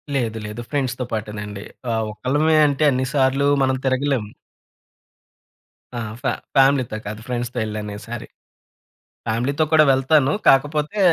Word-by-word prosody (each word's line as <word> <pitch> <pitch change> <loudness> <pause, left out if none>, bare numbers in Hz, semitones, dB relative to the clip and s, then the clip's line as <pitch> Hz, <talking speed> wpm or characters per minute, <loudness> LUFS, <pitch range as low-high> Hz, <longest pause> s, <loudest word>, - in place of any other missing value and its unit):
లేదు, 115 -4 -1
లేదు. 105 +3 -6
ఫ్రెండ్స్‌తో 130 -3 -2
పాటేనండి. 105 -2 -5 0.3
ఆహ్, 110 -1 0
ఒక్కలమే 145 +8 +1
అంటే 145 +1 0
అన్ని 130 0 0
సార్లూ 135 0 +2 0.2
మనం 130 0 +2
తిరగలేం. 130 -3 +1 1.7
ఆ! - - -3 0.2
ఫా - - +1 0.2
ఫ్యామిలీతో 135 -4 +3
కాదు 105 +1 -6
ఫ్రెండ్స్‌తో 120 0 -3
వెళ్ళానీసారి. 110 +1 -5 1.0
ఫ్యామిలీతో 130 +7 0
కూడా 155 -1 +7
వెళ్తాను. 135 +1 +3 0.2
కాకపోతే 150 +7 +3
130 Hz, 115 wpm, -21 LUFS, 110-140 Hz, 1.7 s, కూడా